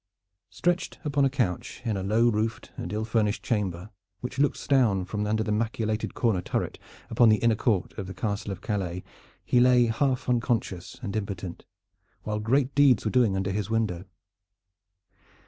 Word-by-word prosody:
Stretched 175 0 -1
upon 140 -1 +2
a - - +3
couch 120 -10 -2
in 110 -3 0
a 95 - -2
low 110 +5 +3
roofed 110 0 -1
and 85 - -5
ill 110 +1 -2
furnished 110 -2 0
chamber, 100 -3 -2 0.3
which 125 +2 -5
looks 145 0 +1
down 115 -9 +3
from 105 +2 -3
under 110 +1 +1
the 110 - -2
machicolated 110 0 -1
corner 110 -7 +1
turret - - -3 0.3
upon 115 0 +5
the 110 - +6
inner 115 +1 +2
court 110 -4 0
of 95 - -4
the 95 - -6
Castle 105 -3 -2
of 95 - -7
Calais, 90 -4 -3 0.4
he 125 - +3
lay 125 -1 +5
half 125 +3 0
unconscious 115 -7 -1
and 100 -3 -4
impotent, 95 -4 -5 0.6
while 105 0 -2
great 130 +5 +1
deeds 135 -7 +4
were 110 - +1
doing 120 -6 +3
under 95 0 -1
his 105 0 -2
window. 110 -6 -1
110 Hz, 170 wpm, -27 LUFS, 100-120 Hz, 0.6 s, the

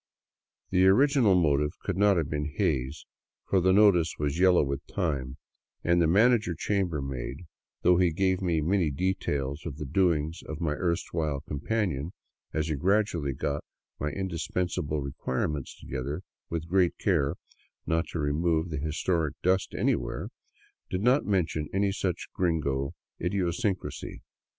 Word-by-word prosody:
The 95 0 +5
original 125 -1 +5
motive 75 -3 +2
could 95 - -2
not 100 0 +4
have 80 -4 0
been 75 0 -3
Hays; 65 +2 -1 0.4
for 95 - +3
the 95 +1 +4
notice 95 -5 +5
was 75 +2 -1
yellow 90 -3 +5
with 70 0 -3
time, 70 -8 -2 0.5
and 85 0 +3
the 85 - +4
manager 105 0 +4
chambermaid, 75 -7 -2 0.4
though 90 -1 +5
he 90 -2 +3
gave 95 +3 +1
me 85 -4 +1
many 85 +1 +2
details 70 -3 -2
of 75 -4 -6
the 75 - -5
doings 80 +1 +1
of 80 0 -6
my 80 -3 0
erstwhile 80 -4 -1
companion 80 0 -2 0.4
as 80 -1 -1
he 80 - -1
grad 100 +9 +3
ually 70 -6 -3
got 70 +1 -2 0.4
my 75 - -1
indispensable 85 -2 -2
requirements 70 +1 -3
together, 70 +6 -4 0.3
with 85 -1 -3
great 90 0 +2
care 75 -8 +1 0.5
not 80 +1 0
to - - -5
remove 80 +2 0
the 75 - -2
historic 80 0 -1
dust 95 +1 +1
anywhere, - - -1 0.6
did 90 - -2
not 125 +4 +3
mention 85 -6 0
any 100 +1 +2
such 95 -3 -2
gringo 70 -6 0 0.3
idiosyncrasy. 95 +2 -2
85 Hz, 140 wpm, -28 LUFS, 75-95 Hz, 0.6 s, The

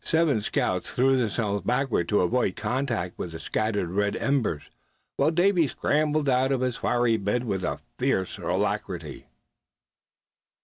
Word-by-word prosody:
The - - -14
seven 160 -8 +2
scouts 90 -3 -1
threw 135 +2 +3
themselves 105 -5 -1
backward 125 -6 0
to 105 - +3
avoid 95 0 +1
contact 120 -9 -2
with 85 - -5
the 80 - -6
scattered 105 -5 -1
red 105 +2 0
embers, 120 - 0 0.5
while 140 - +3
Davy 175 0 +3
scrambled 150 +2 0
out 130 0 +2
of 130 -2 +1
his 125 -2 0
fiery 120 -3 +2
bed 105 +4 -1
with 95 -6 -2 0.4
furious 95 -1 0
alacrity. - - -3
120 Hz, 140 wpm, -26 LUFS, 100-135 Hz, 0.5 s, threw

